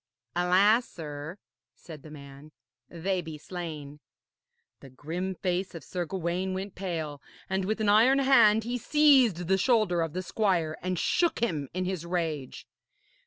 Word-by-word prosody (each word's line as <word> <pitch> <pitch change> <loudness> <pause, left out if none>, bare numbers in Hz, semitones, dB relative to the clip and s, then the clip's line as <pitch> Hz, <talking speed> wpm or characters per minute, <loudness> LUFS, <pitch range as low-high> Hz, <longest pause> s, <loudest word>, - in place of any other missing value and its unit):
'Alas, 195 +7 +3
sir,' 150 +2 -7 0.4
said 155 -4 -11
the 155 - -12
man, 140 0 -12 0.4
'they 180 +2 -2
be 160 -2 -8
slain.' 150 -4 -7 0.8
The 135 - -13
grim 170 +8 -5
face 185 0 -2
of 165 - -8
Sir 180 -1 -4
Gawaine 185 +2 -2
went 195 +1 -5
pale, 160 -6 -4 0.3
and 190 0 -1
with 215 +3 -1
an 215 -1 +1
iron 230 +6 +5
hand 235 -6 +5
he 245 +2 -3
seized 260 - +4
the 190 +1 +2
shoulder 215 -6 +2
of 165 -2 -2
the 185 +1 -3
squire 180 -6 0
and 185 0 -2
shook 345 - +1
him 155 - -1
in 185 0 -1
his 185 -3 -3
rage. 165 -6 -3
180 Hz, 155 wpm, -28 LUFS, 160-205 Hz, 0.8 s, iron